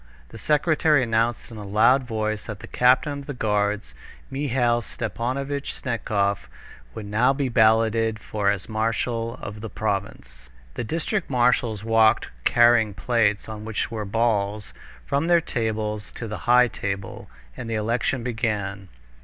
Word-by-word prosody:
The - - -11
secretary 150 -2 +3
announced 115 0 0
in 115 - -9
a 105 - -7
loud 115 +7 +3
voice 110 -2 -3
that 105 -3 -7
the - - -8
captain 130 +4 +2
of 140 - -10
the 145 - -5
guards, 105 -2 -1 0.4
Mihail 125 -4 +1
Stepanovitch 130 +5 -3
Snetkov, 100 -5 -1 0.5
would 105 - -6
now 115 +6 +2
be 135 -1 -1
balloted 110 -1 +3
for 105 -1 -1
as 100 -2 -2
marshal 115 +2 -1
of 105 +1 -7
the 110 - -6
province. 65 -8 -4 0.2
The - - -4
district 165 - -2
marshals 120 -4 +1
walked 110 -1 +3 0.2
carrying 120 -3 +4
plates, 110 -4 +1
on 110 -1 -7
which 110 +1 -3
were 110 -2 -3
balls, 105 -1 0 0.3
from 145 +4 0
their 175 -1 +5
tables 110 - -3
to 115 - -6
the 105 - -5
high 125 0 +7
table, 100 - -5 0.3
and 115 - -7
the 115 - -1
election 115 +3 -1
began. 105 -5 -3
115 Hz, 145 wpm, -24 LUFS, 105-125 Hz, 0.5 s, high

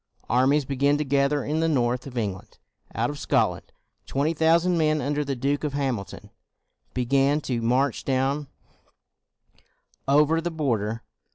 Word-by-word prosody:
Armies 135 +4 +3
began 140 +2 +1
to 150 - -1
gather 140 +1 +1
in 155 +2 -1
the 165 0 +1
north 125 -3 0
of 125 -2 -9
England. 100 -5 -4 0.4
Out 120 +5 0
of 145 - -8
Scotland, - - 0 0.4
twenty 145 +4 0
thousand 165 +3 +3
men 155 -2 +2
under 145 +2 -1
the 140 -1 -3
Duke 140 +4 -1
of 150 -2 -2
Hamilton 130 -8 -4 0.6
began 135 +3 +2
to 125 -4 -2
march 125 +3 +1
down 135 +2 0 1.6
over 150 +4 +3
the 175 - -2
border. 115 -9 -2
140 Hz, 145 wpm, -25 LUFS, 125-150 Hz, 1.6 s, Armies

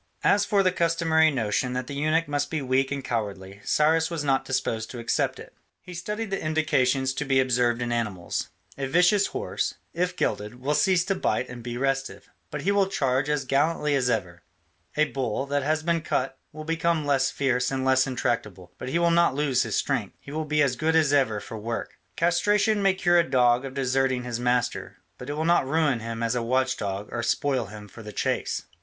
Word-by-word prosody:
As 205 0 +4
for 205 -2 +2
the 185 - +3
customary 165 -2 +3
notion 125 -1 -1
that 125 0 -2
the 140 - -7
eunuch 155 +3 +1
must 145 0 -1
be 160 - -2
weak 130 0 +1
and 140 -1 -3
cowardly, 100 -5 -4
Cyrus 160 +2 +2
was 165 -3 -3
not 135 -2 +2
disposed 115 -4 -2
to 125 - -8
accept 115 0 0
it. - - -12 0.3
He 180 - -11
studied 210 +5 -4
the 195 - -2
indications 135 -4 +1
to 150 - -2
be 135 -2 +2
observed 125 -2 +2
in 120 - -3
animals: 105 -7 -2 0.3
a 135 - -1
vicious 180 +7 +4
horse, 450 +5 -3 0.2
if 180 +1 -1
gelded, 105 +3 -2
will 140 +4 0
cease 180 +1 +3
to 195 - +1
bite 155 -8 -1
and 120 0 -8
be 120 0 -5
restive, 135 +1 -2 0.2
but 150 - -5
he 200 - +2
will 200 -1 +3
charge 135 -5 0
as 150 -2 0
gallantly 150 +3 +1
as 130 -3 +2
ever; 90 -7 -2 0.6
a 155 - +5
bull 135 -3 -2
that 145 0 0
has 155 +3 0
been 170 0 +1
cut 135 -3 -1 0.2
will 155 0 -8
become 165 -1 0
less 135 -2 +2
fierce 130 -3 0
and 130 -1 -2
less 130 0 +3
intractable, 105 -8 -3
but - - -5
he 155 - 0
will 170 0 +3
not 170 -5 +3
lose 140 -3 +1
his - - -1
strength, - - -1
he 140 - -11
will 155 +1 -3
be 150 0 +2
as 130 -3 +1
good 160 +4 0
as 155 -3 +3
ever 130 -7 +2
for 110 +2 -8
work; 115 -1 -5 0.2
castration 205 +5 +2
may 195 -1 +3
cure 175 -2 +3
a - - +5
dog 125 -1 +3
of 135 0 -7
deserting 130 -1 +1
his 120 -1 -4
master, 125 -1 -1 0.2
but 125 - -8
it - - -2
will 155 +2 -2
not 170 -5 +3
ruin 150 -4 +2
him 115 +1 -5
as 115 0 +1
a 120 - -1
watch 130 +2 +1
dog 100 0 -4
or 120 - -2
spoil 130 -1 0
him 105 0 -10
for 115 - -12
the 105 -1 -8
chase. - - -1
135 Hz, 215 wpm, -26 LUFS, 120-160 Hz, 0.6 s, a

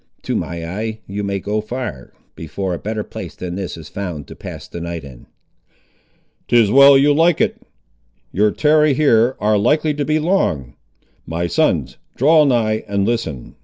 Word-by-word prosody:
To - - -2
my 85 -1 -4
eye 110 +5 -5
you 100 +2 -5
may 100 0 -2
go 105 +3 -2
far, 110 - -6 0.2
before 90 +4 -4
a 85 - -4
better 110 0 -3
place - - -8
than 90 -1 -6
this 95 -2 -5
is 80 -2 -10
found 85 -7 -6
to - - -9
pass - - -9
the 85 - -8
night 85 -2 -5
in." 65 -4 -13 1.2
"Tis 115 -4 +4
well 140 +2 +8
you 145 +2 +4
like 165 +2 +3
it. - - 0 0.7
Your 105 +3 +2
tarry 150 +3 +3
here 125 -4 +3
ar' 105 0 +2
likely 150 +7 +2
to 145 0 -2
be 155 +2 +1
long. 155 - 0 0.5
My 85 +2 -2
sons, 85 - 0 0.2
draw 155 +3 +5
nigh 110 -5 +1
and 100 -1 0
listen. 110 - -3
105 Hz, 170 wpm, -19 LUFS, 90-140 Hz, 1.2 s, well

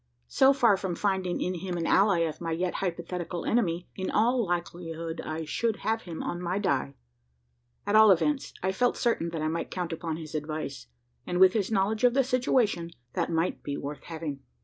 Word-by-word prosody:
So 265 +1 +5
far 240 -7 +4
from 190 -2 -3
finding 190 -2 0
in 180 - -1
him 180 0 -3
an 165 - -2
ally 195 -2 +4
of 160 -1 -2
my 165 -1 -2
yet 175 +2 -1
hypothetical 175 -1 -3
enemy, 180 -7 +1
in 190 -1 -3
all 240 +3 +3
likelihood 170 -2 -4
I 155 +1 -4
should 225 +8 0
have 225 +1 +1
him 170 -5 -6
on 175 - -3
my 180 +2 -1
die. 70 - 0 0.9
At 205 - +1
all 215 0 +8
events, 270 - +2
I 190 - +2
felt 245 +5 +1
certain 230 -8 +1
that 165 -2 -4
I - - +1
might 165 +1 -2
count 175 -2 -3
upon 165 -1 -3
his 155 -2 -8
advice; 155 -2 -4 0.4
and, 180 - -1
with 185 0 +7
his 205 -4 0
knowledge 215 +2 +1
of 245 0 +5
the 270 - +4
situation, 245 -8 +1 0.2
that - - -1
might 165 +2 0
be 140 -1 -4
worth 145 +1 -6
having. 160 -4 -5
180 Hz, 195 wpm, -28 LUFS, 165-210 Hz, 0.9 s, all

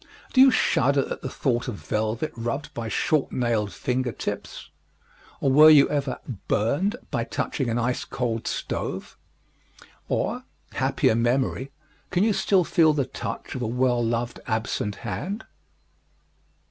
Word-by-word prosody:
Do 260 - +6
you 270 - +9
shudder 140 - +2
at - - -4
the 130 - -4
thought 125 -2 -1
of 120 - -3
velvet 110 +7 -2
rubbed 120 +6 -4
by 115 -1 -4
short 145 +5 +1
nailed 115 -5 0
finger 125 +6 -1
tips? - - -6 0.7
Or 135 - +2
were 155 +3 +9
you 150 -3 +7
ever 140 -3 -1 0.3
"burned" 145 - +1 0.2
by - - 0
touching 135 -5 -2
an 115 - 0
ice 120 +1 0
cold 115 -3 -3
stove? - - -4 0.9
Or, - - -1 0.3
happier - - +2
memory, 125 +3 0 0.4
can 180 +1 +2
you 220 -1 +3
still 195 -1 +3
feel 160 -2 +4
the 140 -3 0
touch - - -6
of 130 - -4
a 120 - -1
well 125 0 +1
loved 115 +1 -2
absent 110 -3 -1
hand? 200 +4 -4
125 Hz, 145 wpm, -25 LUFS, 115-150 Hz, 0.9 s, you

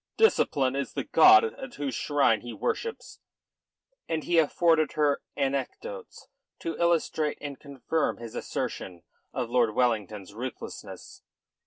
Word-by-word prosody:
Discipline 135 - +3
is 140 - -3
the - - -2
god 375 +2 +7
at 265 - -5
whose 140 -3 -3
shrine 140 -6 +2
he 120 -1 -7
worships." 455 - -4 0.9
And 160 -2 -1
he 175 -1 +3
afforded 160 0 +3
her 145 -2 +1 0.2
anecdotes 140 - -4 0.3
to 165 - -3
illustrate 165 -3 +1
and 140 -2 -7
confirm 145 +3 -2
his 115 -1 -9
assertion 90 -2 -4 0.3
of 120 - -3
Lord 120 -4 +2
Wellington's 105 -5 0
ruthlessness. 125 +3 -8
140 Hz, 125 wpm, -27 LUFS, 120-165 Hz, 0.9 s, god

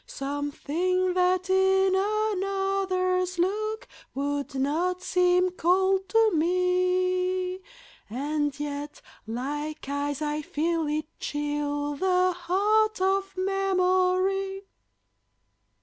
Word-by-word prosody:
Something 295 +6 -1
that 365 0 +2
in 380 0 +3
another's 390 -3 0
look 430 +5 -1 0.3
would 285 0 -2
not 335 +7 0
seem 360 0 +3
cold 380 +2 +1
to 450 -1 +4
me, 365 +2 +1 0.5
And 290 +4 -2
yet 290 0 -5 0.3
like 290 +6 -4
ice 285 +1 -2
I 300 0 -2
feel 320 +2 -1
it 305 +1 -1
chill 290 0 -2
the 365 +1 +2
heart 415 +5 +1
of 390 0 0
memory. 385 0 +1
365 Hz, 85 wpm, -26 LUFS, 295-380 Hz, 0.5 s, to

